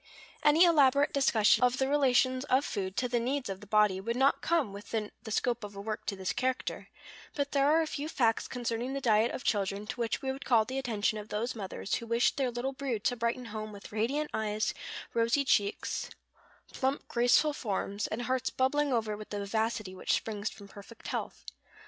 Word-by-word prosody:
Any 305 +4 +6
elaborate 285 -4 +4
discussion 245 -5 +4
of 250 0 +3
the 265 - +1
relations 260 -2 +3
of 275 +1 +2
food 190 -1 -3
to 250 - +1
the 240 0 0
needs 255 +1 -2
of 195 0 -5
the 210 - -12
body 210 -2 +3
would 230 +4 -2
not 265 +2 +3
come 310 -12 +1
within 210 +1 -4
the 220 - -8
scope 235 +1 0
of 205 -1 -8
a - - -7
work 215 +2 -3
of 200 - -8
this 190 +1 -2
character; 255 +2 -2 0.5
but 285 -1 -1
there 280 0 +3
are 320 +2 +4
a - - -2
few 300 0 -4
facts 230 -7 +1
concerning 240 +1 -3
the 275 - -2
diet 225 -2 +3
of - - -5
children 200 0 0
to 245 - -6
which 230 -1 -1
we 265 - 0
would 270 +1 -7
call 230 -4 +4
the 260 +3 -3
attention 215 -4 -1
of 210 - -9
those 225 +4 -2
mothers 195 -2 -5
who 230 - -1
wish 235 +1 +3
their 265 -3 0
little 245 +3 -3
brood 260 -6 -3
to 245 - +1
brighten 235 +1 -2
home 215 0 -5
with 200 -1 -11
radiant 260 +8 -1
eyes, 215 0 -1 0.4
rosy 235 +5 +2
cheeks, 205 -5 0 0.6
plump, 270 +1 -1
graceful 245 +5 +3
forms, 205 -3 -2
and 235 +3 -3
hearts 260 +1 0
bubbling 285 +2 +1
over 220 -3 0
with 215 0 -10
the 205 - -4
vivacity 215 -1 -2
which 185 - -1
springs 210 -1 -1
from 200 - -12
perfect 205 +3 -11
health. - - -4
235 Hz, 205 wpm, -30 LUFS, 210-265 Hz, 0.6 s, Any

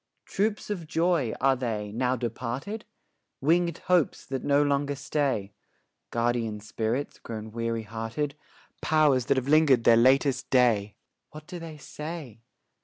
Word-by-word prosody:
Troops 210 +1 -1
of 175 -6 -4
joys 165 -6 +1
are 135 0 +4
they, 110 -5 -3
now 125 +3 0
departed? 125 - -4 0.5
Winged 170 +3 +2
hopes 180 -4 +2
that 135 -1 -4
no 145 0 +3
longer 145 0 0
stay? 135 -8 -1 0.6
Guardian 115 -2 -1
spirits 110 +5 -3
grown 110 -1 -7
weary 115 0 -2
hearted? 115 +7 -3 0.5
Powers 150 -5 +3
that 140 - +3
have 130 0 -1
linger'd 145 -5 +5
their 115 0 +6
latest 130 +1 +3
day? 115 -5 +3 0.3
What 155 0 -11
do 175 - -7
they 165 -2 -8
say? 150 -6 -8
130 Hz, 135 wpm, -27 LUFS, 115-155 Hz, 0.6 s, their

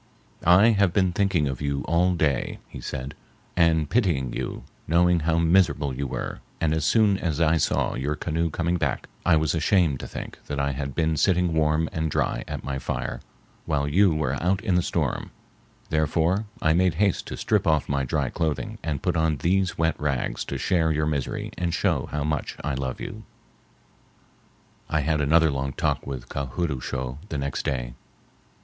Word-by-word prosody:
"I 95 +6 +7
have 100 -5 +3
been 95 -2 +3
thinking 90 -6 +1
of 65 -1 -4
you 70 -1 -1
all 90 +2 +2
day," 75 -6 0
he - - -9
said, 65 +2 -5 0.4
"and 80 -3 +3
pitying 80 - +1
you, - - -4 0.2
knowing 85 +2 +4
how 80 +1 +1
miserable 85 -5 +3
you 70 +2 -3
were, - - -4 0.2
and 80 -2 +1
as 80 -1 0
soon 105 -4 +4
as 80 -3 -1
I 80 0 +4
saw - - +1
your 70 +4 -2
canoe 80 +2 -1
coming 85 +3 0
back - - -2 0.2
I 90 - +4
was 80 -2 +1
ashamed 80 -4 +2
to - - -6
think - - -8
that 70 -1 -3
I 70 0 +1
had 70 0 -4
been 80 -1 +1
sitting 90 0 +2
warm 80 0 +2
and 80 -1 -1
dry - - 0
at - - -5
my 70 -1 -3
fire - - -3 0.5
while 70 -2 0
you 95 +5 +4
were 75 -4 -1
out 95 +3 +2
in 95 - +1
the 90 - +4
storm; - - -1 0.6
therefore 80 +6 +1 0.2
I 80 - +4
made 90 -1 +2
haste 100 +2 +1
to - - -6
strip - - +1
off 80 -2 +2
my 70 -1 0
dry 65 - -1
clothing 80 -3 -2
and 75 -3 -3
put - - +1
on 80 -2 +1
these 95 +4 +1
wet 80 0 +1
rags 70 -4 -1
to - - -4
share 80 -3 +1
your 75 0 +1
misery 75 -4 -2
and 85 -1 0
show - - 0
how 75 0 -1
much 75 0 -2
I 75 0 -1
love 65 -1 -3
you." 110 - -6 1.7
I 75 - +1
had 75 +1 +1
another 80 +2 +4
long 70 0 -2
talk - - -1
with 65 -3 -5
Ka 70 0 -3
hood 85 +6 -2
oo 65 -2 -4
shough 65 0 -4
the 75 - -3
next 70 0 -3
day. - - -2
80 Hz, 190 wpm, -25 LUFS, 70-85 Hz, 1.7 s, I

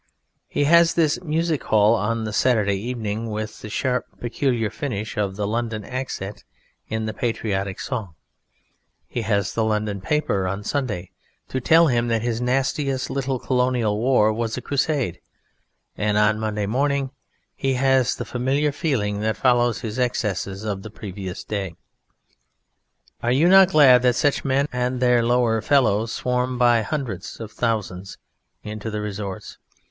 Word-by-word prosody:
He - - 0
has 170 +3 +5
his 160 -2 +2
music 160 -1 0
hall 105 +1 +4
on 115 0 0
the 110 -1 -4
Saturday 110 -4 +2
evening 110 0 -3
with 110 0 -5
the 110 - -7
sharp, 125 +3 -1
peculiar 120 -2 -1
finish 110 -8 -4
of 100 -2 -1
the 105 0 -2
London 110 -1 -2
accent 125 -6 -5 0.4
in 110 0 -2
the 110 - -3
patriotic 100 -4 -2
song, 105 - -4 0.9
he 120 - -3
has 100 -3 0
the 115 - 0
London 105 -2 -1
paper 100 -7 0
on 100 +2 -3
Sunday 105 -8 -3 0.4
to 130 - -2
tell 165 +6 +6
him 120 -5 +1
that 115 -1 0
his 120 -1 -1
nastiest 135 +1 0
little 135 -1 -1
Colonial 125 -4 0
War 115 -3 +3
was 115 +1 -2
a - - -4
crusade, 140 - -1 0.8
and 105 0 0
on 105 +1 +3
Monday 105 -1 -2
morning 135 +4 0 0.4
he 135 -1 0
has 130 -1 +3
the - - -5
familiar 135 +4 0
feeling 120 - -1
that 110 +1 -1
follows 120 -2 +2
his 110 +2 -4
excesses 100 -5 -1
of 100 -3 -3
the 110 - -8
previous 95 -3 -7
day.... 95 -5 -4 1.5
Are 120 - +1
you 145 +7 +4
not 190 0 +7
glad 140 -8 +7
that 125 -1 +3
such 145 +1 +1
men 135 +1 +1
and 125 0 -1
their 125 -2 +3
lower 120 -2 +2
fellows 115 -6 +2
swarm 125 0 -1
by 120 -1 +4
hundreds 115 - -4
of 110 -2 -7
thousands 100 -6 -3 0.5
into 105 +1 -5
the 105 -1 -3
"resorts"? 100 -2 -6
115 Hz, 155 wpm, -23 LUFS, 105-130 Hz, 1.5 s, not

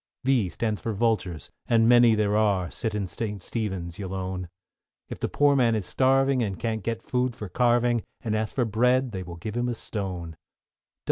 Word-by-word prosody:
=V= 125 -8 +2
stands 110 +3 -2
for 115 - -2
Vultures, 100 -7 -1 0.2
and 115 -1 +4
many 120 -1 +6
there 105 -1 +1
are 100 -6 +2
Sit 105 +9 -3
in 105 -2 -1
St. 100 +1 -5
Stephen's, 95 -6 -4
you'll 95 -1 -4
own; 95 -1 -4 0.6
If - - -6
the - - -2
poor 145 -1 +3
man 120 -4 +3
is 105 -4 -2
starving 135 0 +2
and 100 -5 -2
can't 110 -2 -2
get 115 +1 -3
food 125 -1 -1
for 105 - -6
carving, 120 +2 +2 0.2
And 110 -3 -1
asks 110 -1 -2
for 125 - +1
bread, 125 +3 +2
they 95 -3 -4
will 90 -1 -8
give 105 +6 -6
him 120 0 0
a 120 - -2
stone. 90 -7 -5
110 Hz, 195 wpm, -26 LUFS, 95-120 Hz, 0.6 s, many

